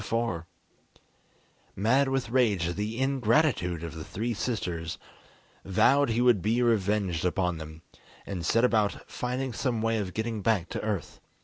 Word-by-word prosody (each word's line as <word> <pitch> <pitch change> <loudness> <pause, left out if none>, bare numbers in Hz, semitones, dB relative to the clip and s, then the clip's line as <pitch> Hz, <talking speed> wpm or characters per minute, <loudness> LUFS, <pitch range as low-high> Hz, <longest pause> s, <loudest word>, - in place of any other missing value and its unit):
Meanwhile 115 +2 0
Paul, 85 -8 -4 1.3
mad 130 +8 +3
with 130 -4 -1
rage 110 -9 +2
at 85 - -4
the 105 +3 -3
ingratitude 130 - +1
of 85 -2 -5
the 80 -1 -7
three 115 +8 -3
sisters, 90 -8 -3 0.7
vowed 115 +8 +3
he 115 +1 +1
would 120 -6 +4
be 115 +5 +1
revenged 100 -6 +1
upon 90 -2 0
them, 80 +1 -10 0.4
and 95 -4 -4
set 115 +8 +2
about 110 -4 +1
finding 125 +1 -3
some 120 -3 -1
way 115 0 +1
of 95 -3 -4
getting 110 -1 -2
back 100 -5 +1
to - - -4
earth. 105 -4 -3
110 Hz, 155 wpm, -28 LUFS, 90-120 Hz, 1.3 s, would